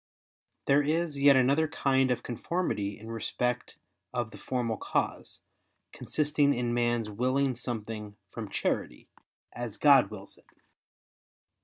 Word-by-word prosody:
There 140 +1 +5
is 155 0 0
yet 140 0 +7
another 140 +5 +3
kind 135 -3 +2
of 125 - 0
conformity 120 - -2
in 110 +1 -9
respect 125 +2 -2 0.3
of 120 -3 -2
the - - -11
formal 120 -4 -2
cause, - - -2 0.5
consisting 150 -1 +1
in 120 -1 -1
man's 120 -2 +1
willing 130 +5 +1
something 110 -3 -5
from - - -6
charity, - - -2 0.4
as 120 -3 -5
God 140 -3 +6
wills 100 -2 -8
it. - - -26
125 Hz, 125 wpm, -29 LUFS, 115-140 Hz, 0.5 s, yet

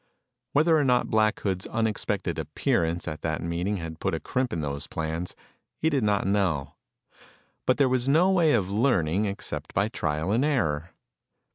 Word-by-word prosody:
Whether 160 +3 +4
or - - +2
not 125 -2 +2
Black 110 -1 +3
Hood's 95 -2 -2
unexpected 110 -2 -1
appearance 85 +1 -1
at 75 0 -5
that 80 -2 -1
meeting 85 +5 -2
had 80 -2 -7
put - - 0
a - - -3
crimp 130 -1 -1
in 85 - -2
those 70 -1 -4
plans, 80 +2 -4 0.4
he 160 - +1
did 135 -5 +1
not 105 -1 +1
know. 95 -9 0 0.9
But 130 - +4
there 140 -2 +4
was 130 0 +1
no 170 +7 +5
way 170 -5 +4
of 105 -6 +2
learning 100 - +1
except 80 -6 -5
by 100 +3 +2
trial 80 -2 -2
and 115 +5 +2
error. 85 - 0
100 Hz, 170 wpm, -26 LUFS, 80-125 Hz, 0.9 s, no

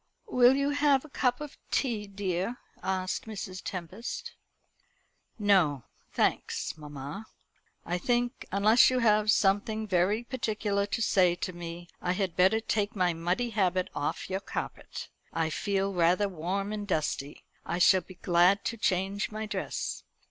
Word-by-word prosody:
"Will 250 - +5
you 280 +1 +1
have 285 -1 +3
a - - -13
cup 250 -3 +1
of 295 -1 -8
tea, 225 -6 0
dear?" 195 +3 -2 0.2
asked 185 0 -2
Mrs. 190 -3 -6
Tempest. 200 - -5 1.0
"No, 185 - +3 0.3
thanks, - - 0
mamma. 150 +6 -8 0.6
I 175 +1 -1
think, 245 +4 -1
unless 210 +4 +6
you 255 - +1
have 215 -3 +3
something 215 +1 +2
very 195 +4 +2
particular 215 -5 -1
to 225 +3 -1
say 180 -4 +4
to 185 +1 -4
me, 175 0 -7
I 180 - 0
had 185 -3 -2
better 190 +5 +4
take 215 0 -1
my 180 -3 +2
muddy 175 +9 -1
habit 185 -3 +1
off 145 - -2
your 190 0 -2
carpet. 195 - -6 0.3
I 160 -1 0
feel 195 +2 -1
rather 180 +3 +3
warm 195 +3 -3
and 205 -1 -4
dusty. 150 -5 -2 0.2
I 170 - -2
shall 185 +1 +6
be 185 +2 -14
glad 180 +3 +3
to 230 - -2
change 195 0 0
my 215 0 -4
dress." 215 - -3
200 Hz, 150 wpm, -29 LUFS, 180-220 Hz, 1.0 s, unless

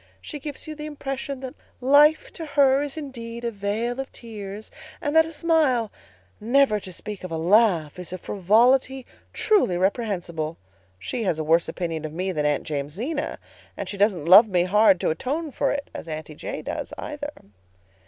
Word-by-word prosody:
She 300 - -7
gives 285 0 -7
you 310 - -6
the 300 0 -7
impression 275 -2 -5
that 260 -1 -6 0.3
life 290 +4 +4
to 330 - -7
her 280 -2 +4
is 290 +1 -4
indeed 235 -5 -7
a 235 - -1
vale 220 +4 -2
of 270 - -5
tears, 210 -2 -8 0.3
and 290 +1 -2
that 320 0 +6
a - - -8
smile, 300 -9 +2 0.5
never 240 -1 +3
to 185 - -9
speak 205 +3 -7
of 185 - -5
a 165 - -3
laugh, 175 -3 +3
is 180 - -8
a 185 - -4
frivolity 245 +8 +2 0.3
truly 390 - +2
reprehensible. 175 -6 -1 0.4
She 230 - -4
has 170 -4 +1
a 155 - -2
worse 165 +2 +2
opinion 165 -3 -3
of 155 -1 -5
me 185 +3 -2
than 150 -4 0
Aunt 145 -1 0
Jamesina, 180 - -3 0.4
and - - -4
she - - -4
doesn't 195 -6 +2
love 195 +6 +9
me 180 -4 +2
hard 195 0 +4
to - - +1
atone 290 - -3
for 275 - 0
it, 285 0 -3
as - - -7
Aunty 155 -1 -6
J. - - -6
does, - - -5
either. 290 -1 -5
220 Hz, 185 wpm, -24 LUFS, 180-275 Hz, 0.5 s, love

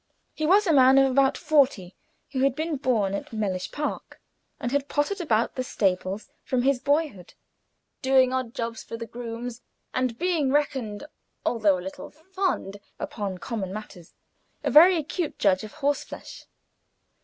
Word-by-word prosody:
He 310 - -2
was 405 +5 +5
a 330 - +3
man 265 -1 +6
of 270 -1 +5
about 270 +1 +3
forty, 275 - +2 0.4
who 270 - -2
had 270 0 +2
been 315 0 -2
born 225 -8 +1
at 200 - -5
Mellish 200 -5 -2
Park, 295 0 -4 0.4
and 240 - -3
had 280 0 0
pottered 360 +7 0
about 230 -9 +1
the 255 - -2
stables 195 -3 -1 0.2
from 250 -2 0
his 270 -1 +2
boyhood, 285 - -1 0.7
doing 260 -1 +4
odd 255 -1 -2
jobs 230 -3 -3
for 230 - -7
the 230 - -5
grooms, 235 +1 -6 0.3
and 255 -2 -1
being 330 -5 +1
reckoned, 265 -6 -1 0.4
although 215 -5 +3
a 180 - -8
little 190 - -7
"fond" 370 - -3 0.2
upon 200 -4 -4
common 190 -1 -4
matters, 195 -4 -9 0.5
a - - 0
very 345 +4 +8
acute 320 +1 -3
judge 190 -1 +2
of 215 - -9
horseflesh. 290 -1 -4
255 Hz, 155 wpm, -26 LUFS, 215-290 Hz, 0.7 s, very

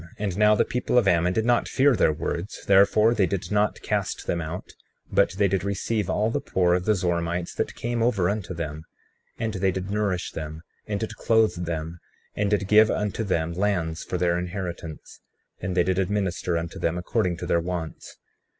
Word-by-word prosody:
And 100 -4 -2
now 105 +1 +5
the - - +2
people 125 0 0
of 115 -5 +4
Ammon 90 -1 +3
did 110 +2 0
not 120 0 +2
fear 135 -1 +3
their 80 - +3
words; 85 +5 -4
therefore 100 +3 +5
they 100 -5 +2
did 95 +2 -3
not 105 0 +1
cast - - -2
them 85 - -1
out, 80 +3 -6 0.4
but 85 - +3
they 100 +1 +2
did 95 -1 0
receive 100 +1 -1
all 110 +2 +1
the - - -1
poor 90 -2 +1
of 90 0 0
the 110 - +3
Zoramites 85 -1 -1
that - - -3
came 120 0 -2
over 110 -7 +2
unto 95 -2 -3
them; 80 -2 -4 0.6
and 110 -1 -2
they 95 -1 +1
did 95 +1 -4
nourish 100 -4 -1
them, 80 0 -6 0.2
and 105 -2 -2
did 110 - -4
clothe 110 -6 +2
them, 80 0 -4 0.4
and 105 -1 0
did 100 -2 +1
give 105 +1 +6
unto 105 +2 -1
them 85 -5 -1
lands 90 -4 -1
for 90 - -3
their 85 0 +1
inheritance; 85 -3 -6 0.4
and 95 -1 -3
they 90 - +5
did 95 +1 0
administer 95 -3 -1
unto 85 0 -5
them 85 +1 0
according 90 -1 0
to 90 - -5
their 85 -1 +2
wants. 85 -2 -5
95 Hz, 195 wpm, -25 LUFS, 85-105 Hz, 0.6 s, give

